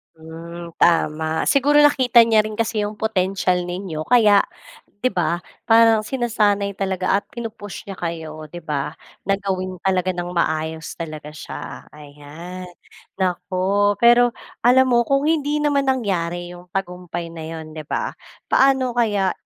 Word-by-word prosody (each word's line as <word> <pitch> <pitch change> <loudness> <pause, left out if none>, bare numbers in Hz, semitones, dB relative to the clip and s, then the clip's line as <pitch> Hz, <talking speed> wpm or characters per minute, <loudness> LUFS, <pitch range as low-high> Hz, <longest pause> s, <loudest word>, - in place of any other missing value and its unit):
Hmm, 165 +1 -10
tama. 160 -1 +1
Siguro 290 +1 +4
nakita 260 -5 +5
niya 220 -2 +4
rin 215 +1 -6
kasi 225 -2 0
yung 210 0 -5
potensiyal 185 -4 0
ninyo 175 -3 -5
kaya 215 -2 +5 0.6
di 255 - +3
ba 175 -4 -1 0.3
parang 225 -1 +5
sinasanay 210 -6 0
talaga 190 0 0
at - - -24
pinu-push 220 -4 -8
niya 195 - -6
kayo 160 -2 -5
di 175 - -7
ba? 150 -2 -2 0.3
Na 195 0 0
gawin 185 -2 -3
talaga 185 -1 +1
ng 175 -1 -4
maayos 160 -1 -2
talaga 155 -2 -6
siya. 150 - -8
Ayan 150 +5 -10 0.5
naku. 185 +2 0
Pero 240 0 +6 0.3
alam 255 +2 +5
mo 240 -1 +3
kung 275 0 +2
hindi 300 -1 +1
naman 280 -2 +1
nangyari 175 -8 -1
yung 175 0 -12
tagumpay 180 -3 -4
na 165 -1 -8
yun 160 -1 -7
di 155 0 -7
ba - - -2 0.4
paano 265 -2 +4
kaya 205 -5 +1
190 Hz, 140 wpm, -21 LUFS, 170-225 Hz, 0.6 s, Pero